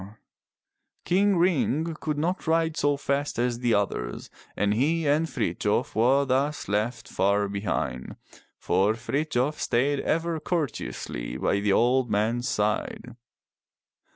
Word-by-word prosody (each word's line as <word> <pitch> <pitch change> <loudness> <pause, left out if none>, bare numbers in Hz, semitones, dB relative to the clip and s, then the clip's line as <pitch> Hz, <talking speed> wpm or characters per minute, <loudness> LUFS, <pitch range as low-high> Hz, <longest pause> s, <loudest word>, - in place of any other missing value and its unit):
King 195 +1 +3
Ring 165 -2 +1
could 150 -2 -2
not 175 +4 -2
ride 160 -1 +2
so 145 -2 +1
fast 140 +1 -2
as 120 0 0
the 120 -2 +2
others 60 -12 -2 0.3
and 105 0 +2
he 155 +7 +1
and 155 +3 +2
Frithjof - - -1
were 130 +5 +3
thus 140 +3 0
left 115 +4 -1
far 100 +1 +1
behind, 100 -10 -3 0.4
for 100 +3 +2
Frithjof 140 +3 -1
stayed 135 +4 +1
ever 165 +2 -1
cour 170 -1 0
teously - - -6
by 100 - +1
the 100 0 +1
old 125 +2 +3
man's 115 +4 0
side. 105 +3 -2
130 Hz, 125 wpm, -26 LUFS, 105-155 Hz, 0.4 s, King